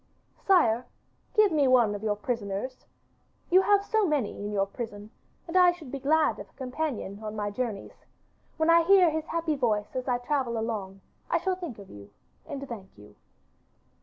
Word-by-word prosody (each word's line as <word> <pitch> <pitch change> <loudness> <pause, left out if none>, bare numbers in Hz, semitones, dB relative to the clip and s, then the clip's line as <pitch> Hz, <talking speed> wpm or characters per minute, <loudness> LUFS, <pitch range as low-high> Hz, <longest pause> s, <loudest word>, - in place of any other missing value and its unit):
'Sire, 250 - +3 0.5
give 425 -3 +5
me 295 -4 +3
one 240 -5 +4
of 205 - -5
your 215 -1 0
prisoners. 210 +2 -4 0.6
You 370 +2 +7
have 405 0 +3
so 440 -1 +1
many 290 -9 0
in 205 +1 -6
your 195 -1 +1
prison, 205 0 -8 0.4
and 335 - -7
I 360 -1 +7
should 320 -7 -11
be 275 - -4
glad 305 +3 +2
of - - -9
a - - -30
companion 255 -6 -4
on 215 0 -5
my 205 -1 -2
journeys. 220 -3 -5 0.5
When 320 +1 +3
I 335 0 +7
hear 365 -1 +5
his 315 +1 -3
happy 330 -1 -1
voice 225 -4 -1
as 255 0 -3
I 250 -1 +2
travel 245 -2 -1
along 205 -4 -4 0.3
I - - +3
shall 375 -1 -1
think 345 - -7
of 200 -2 -12
you 100 0 -12 0.4
and 280 -1 -6
thank 210 -6 -8
you. 105 0 -15
255 Hz, 185 wpm, -28 LUFS, 210-320 Hz, 0.6 s, You